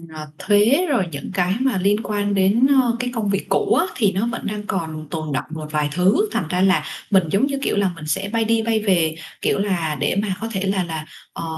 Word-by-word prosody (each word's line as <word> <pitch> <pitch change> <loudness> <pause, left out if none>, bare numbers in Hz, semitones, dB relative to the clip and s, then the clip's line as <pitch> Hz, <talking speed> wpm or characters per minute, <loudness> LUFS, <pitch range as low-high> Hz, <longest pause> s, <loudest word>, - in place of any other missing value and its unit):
ờ, 155 0 -7
thuế 225 - +3
rồi 235 -10 +2
những 140 +5 -6
cái 180 +1 +1
mà 265 -7 +1
liên 205 +4 +1
quan 205 -1 -1
đến, 200 +6 +4
ơ, 235 -2 0
cái 250 0 -1
công 220 -4 -1
việc 195 0 -1
cũ - - +2
á, - - +3
thì 210 -6 +2
nó 195 +4 -1
vẫn 230 -1 -4
đang 210 0 -3
còn 160 -4 -4
tồn 155 -1 -4
đọng 130 - -2
một 155 -1 -6
vài 150 -1 0
thứ, 195 - +2
thành 165 - -1
ra 180 0 0
là 190 0 +3 0.3
mình 190 -2 +5
giống 200 +7 +3
như, 275 -1 -2
kiểu - - 0
là, 195 -3 +2
mình 160 -2 -9
sẽ 190 +7 -1
bay 225 -1 +1
đi 225 0 +2
bay 225 0 +1
về, 175 -7 +1 0.3
kiểu - - +1
là, 175 -6 -1
để 145 - 0
mà 195 -3 -2
có 225 - -2
thể 190 - -2
là 190 -2 +1
là, 160 -2 -5 0.3
ờ, - - -6
195 Hz, 250 wpm, -21 LUFS, 170-220 Hz, 0.3 s, mình